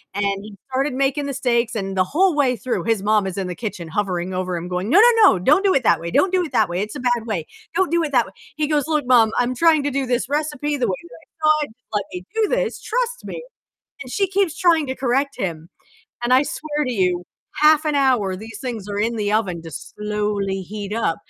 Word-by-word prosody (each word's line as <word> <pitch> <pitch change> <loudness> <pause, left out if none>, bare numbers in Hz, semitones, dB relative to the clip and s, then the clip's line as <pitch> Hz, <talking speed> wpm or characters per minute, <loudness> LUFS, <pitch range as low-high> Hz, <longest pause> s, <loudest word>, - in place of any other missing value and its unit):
and 205 - 0 0.2
he 210 0 -11
started 265 +2 0
making 275 +2 0
the 280 - -3
steaks, 245 -3 0
and 195 -2 -3
the 185 - +3
whole 360 - +2
way 275 -4 +2
through, 250 +1 -3
his 225 -4 +1
mom 210 -2 +2
is 190 0 -5
in 190 - -2
the 180 - -5
kitchen 195 -7 -6
hovering 185 -1 -2
over 185 0 -2
him 175 +1 -5
going, 180 +4 -2
"No, 380 +9 +7
no, 455 -4 +7
no, - - -2
don't 300 - +3
do 380 - +4
it 270 - +2
that 170 -7 +4
way, 170 +1 -5
don't 375 - +3
do 370 -1 +2
it - - -10
that 215 -4 +3
way, 175 +1 -2
it's 210 +6 -4
a 270 - -5
bad 245 -2 0
way, 180 -8 -2 0.3
don't 375 -2 +1
do 340 0 +3
it 295 - -4
that 245 -3 +4
way." 190 - -13 0.2
He 300 0 0
goes, 300 -2 +1
"Look, 300 -4 0
Mom, 235 -3 +5
I'm 245 +1 +1
trying 315 +1 +4
to 290 - -1
do 275 0 -1
this 245 0 -1
recipe 295 0 -1
the 245 -4 0
way 185 - 0
that 170 - -4
I 305 -1 +3
should, - - -16
just 250 - -52
let 205 -1 +1
me 180 0 -6
do 445 -1 +2
this, - - -1
trust - - -2
me." 480 - -6 0.6
And 250 - -10
she 395 +8 +1
keeps 385 -3 0
trying 330 -4 +3
to 260 - -3
correct 270 +2 0
him, 165 -3 -4 0.5
and 240 +1 +2
I 260 +2 +5
swear 300 0 -3
to 255 - -2
you, 180 -4 +1 0.4
half 310 +1 +5
an 300 -1 +1
hour 250 -9 +2
these 215 +2 -9
things 230 -6 -5
are 205 0 -3
in 230 +2 0
the 205 -1 -1
oven 190 -6 0
just 165 -3 -9
slowly 210 -2 -2
heat 205 +2 -6
up, 215 -7 0
245 Hz, 255 wpm, -21 LUFS, 200-295 Hz, 0.6 s, No